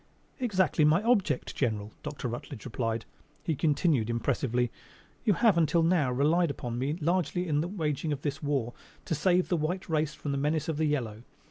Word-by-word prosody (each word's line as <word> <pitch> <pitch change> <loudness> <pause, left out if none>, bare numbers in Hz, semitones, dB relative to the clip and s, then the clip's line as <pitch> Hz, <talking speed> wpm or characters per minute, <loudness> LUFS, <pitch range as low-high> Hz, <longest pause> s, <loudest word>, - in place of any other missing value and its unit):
"Exactly 190 -9 +2
my 155 +6 +4
object, 220 - +1
general," 110 -5 -1
Dr. 145 -3 -4
Rutledge 120 -2 -6
replied. 115 -2 -2 0.4
He 165 - 0
continued 145 -5 +2
impressively: 120 +1 0 0.5
"You 210 - +5
have 205 -3 +4
until 165 +1 +3
now 165 -6 +3
relied 155 +7 +3
upon 120 -4 -4
me 145 +5 -1
largely 175 +2 0
in 150 -2 +1
the 165 - -2
waging 160 -5 -2
of 145 -1 -3
this 145 0 -2
war 135 -5 -1 0.3
to 170 - -1
save 180 +4 +2
the 175 - +2
white 175 +5 -2
race 155 -2 0
from 145 - -4
the 140 - -1
menace 150 +1 0
of 160 -3 -1
the 160 - +1
yellow. 120 -8 -1
150 Hz, 185 wpm, -29 LUFS, 130-170 Hz, 0.5 s, You